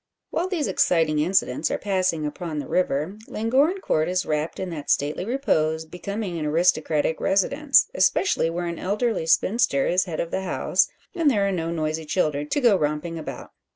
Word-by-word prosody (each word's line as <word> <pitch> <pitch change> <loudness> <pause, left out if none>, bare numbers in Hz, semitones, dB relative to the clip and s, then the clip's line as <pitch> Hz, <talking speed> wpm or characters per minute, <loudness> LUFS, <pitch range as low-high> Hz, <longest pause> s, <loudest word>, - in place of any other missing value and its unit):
While 350 - -1
these 360 -6 -1
exciting 165 -5 +2
incidents 160 -4 +1
are - - -1
passing 185 -6 0
upon 155 +1 -5
the 145 - -4
river, 180 +2 -1
Llangorren 275 - +1
Court 155 - 0
is 185 0 0
wrapped 155 +1 -2
in 185 -2 -4
that 150 -3 -7
stately 145 +4 +1
repose 160 - 0
becoming 180 +2 -5
an 155 - -3
aristocratic 160 -1 +1
residence 275 +9 +3
especially 390 - +2
where 175 +1 -3
an 170 -1 -4
elderly 205 -2 -1
spinster 185 - +2
is 185 +2 +2
head 165 -4 -5
of 170 - -3
the 190 - -1
house, 190 - +1 0.3
and 335 -5 +2
there 205 -6 +2
are - - 0
no 165 -3 -2
noisy 160 -1 -2
children 150 -3 0
to - - +1
go 240 -6 +5
romping 155 +1 -2
about. 155 - -8
175 Hz, 180 wpm, -24 LUFS, 155-205 Hz, 0.3 s, go